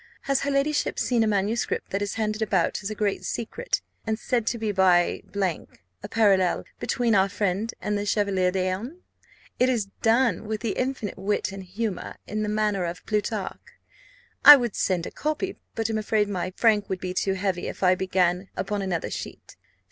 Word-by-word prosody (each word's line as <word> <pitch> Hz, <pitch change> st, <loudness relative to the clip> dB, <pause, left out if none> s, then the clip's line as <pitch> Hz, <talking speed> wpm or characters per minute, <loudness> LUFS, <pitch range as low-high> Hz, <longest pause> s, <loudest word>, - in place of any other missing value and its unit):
Has 275 Hz, -1 st, 0 dB
her 285 Hz, -, -1 dB
ladyship 285 Hz, +2 st, +1 dB
seen 240 Hz, -3 st, +2 dB
a -, -, +1 dB
manuscript 210 Hz, +2 st, -1 dB
that 195 Hz, -, -1 dB
is 205 Hz, -, -2 dB
handed 215 Hz, 0 st, -1 dB
about 195 Hz, -5 st, +1 dB
as 200 Hz, -, -4 dB
a 215 Hz, -, -4 dB
great 205 Hz, -2 st, -1 dB
secret, 475 Hz, -, -3 dB, 0.2 s
and 220 Hz, -1 st, -1 dB
said 235 Hz, -1 st, -1 dB
to 235 Hz, -, 0 dB
be 220 Hz, -2 st, -1 dB
by, 185 Hz, -3 st, +3 dB, 0.8 s
a -, -, -6 dB
parallel 195 Hz, -5 st, +3 dB, 0.2 s
between 240 Hz, -3 st, 0 dB
our 195 Hz, -1 st, +4 dB
friend 205 Hz, +2 st, -1 dB
and 210 Hz, -, -2 dB
the 205 Hz, 0 st, -2 dB
Chevalier 200 Hz, -3 st, +2 dB
d'Eon? 190 Hz, -, -2 dB, 0.6 s
It 250 Hz, -, +4 dB
is 220 Hz, -6 st, 0 dB
done 225 Hz, -3 st, +2 dB
with 215 Hz, 0 st, -3 dB
infinite 230 Hz, -2 st, -2 dB
wit 195 Hz, 0 st, -1 dB
and 195 Hz, 0 st, -7 dB
humour, 195 Hz, +1 st, -4 dB
in 215 Hz, +1 st, -3 dB
the 210 Hz, -, -1 dB
manner 210 Hz, -3 st, 0 dB
of 175 Hz, +1 st, -5 dB
Plutarch. 210 Hz, -1 st, -2 dB, 0.8 s
I 295 Hz, -, +13 dB
would 240 Hz, -5 st, -2 dB
send 180 Hz, -3 st, 0 dB
a -, -, -6 dB
copy, 310 Hz, +5 st, -3 dB, 0.2 s
but 225 Hz, -1 st, 0 dB
am 220 Hz, -1 st, -1 dB
afraid 215 Hz, 0 st, +1 dB
my 185 Hz, -2 st, -3 dB
frank 215 Hz, -3 st, +3 dB
would 190 Hz, -, -2 dB
be 185 Hz, 0 st, -4 dB
too 195 Hz, +1 st, 0 dB
heavy 190 Hz, -2 st, -2 dB
if -, -, -6 dB
I 185 Hz, 0 st, +6 dB
began 185 Hz, 0 st, 0 dB
upon 205 Hz, -2 st, -2 dB
another 185 Hz, -4 st, -2 dB
sheet. -, -, -7 dB
210 Hz, 185 wpm, -25 LUFS, 190-225 Hz, 0.8 s, I